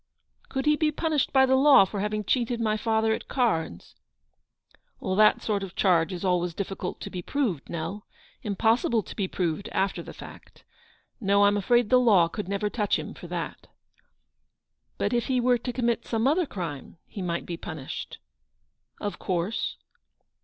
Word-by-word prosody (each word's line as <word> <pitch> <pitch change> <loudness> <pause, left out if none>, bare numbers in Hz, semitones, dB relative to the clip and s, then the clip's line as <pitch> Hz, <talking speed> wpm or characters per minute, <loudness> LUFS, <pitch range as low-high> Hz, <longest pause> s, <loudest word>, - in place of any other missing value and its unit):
" - - -36
Could 265 0 -2
he 300 0 +4
be 305 0 +1
punished 310 -1 0
by 265 -1 +5
the 265 0 +3
law 270 -7 +7
for 200 +1 -5
having 210 +1 -1
cheated 240 +2 0
my 215 -2 +1
father 220 0 +1
at - - -5
cards? 165 - -1 0.5
" - - -58
" - - -34 0.2
That 215 0 +5
sort 205 -2 0
of 190 -2 -7
charge 175 -2 +3
is 180 +1 -4
always 175 -2 +1
difficult 195 -2 -4
to - - -6
be 180 - -4
proved, 210 - -2
Nell; 170 +5 -5 0.3
impossible 225 +1 +1
to - - -10
be 195 -3 -1
proved 180 +1 -2
after 195 +1 0
the - - -9
fact. - - -13 0.6
No, 200 -2 +3
I'm 205 0 +4
afraid 235 +3 +2
the 255 - +7
law 205 -9 +5
could 200 +3 -6
never 200 +1 -1
touch 210 -1 0
him - - -6
for - - -10
that/' - - -5 0.7
" - - -51
But - - -1
if 240 -1 0
he 255 -1 +1
were 245 0 +3
to 245 +2 -4
commit 235 -2 -1
some 225 0 0
other 320 +3 +2
crime, 165 - -6
he 200 - -8
might 170 -2 -2
be 175 - -4
punished? 160 -5 -7 0.3
" - - -49
" - - -52
Of 205 - -4
course." 185 +4 -2
210 Hz, 190 wpm, -26 LUFS, 180-240 Hz, 0.7 s, law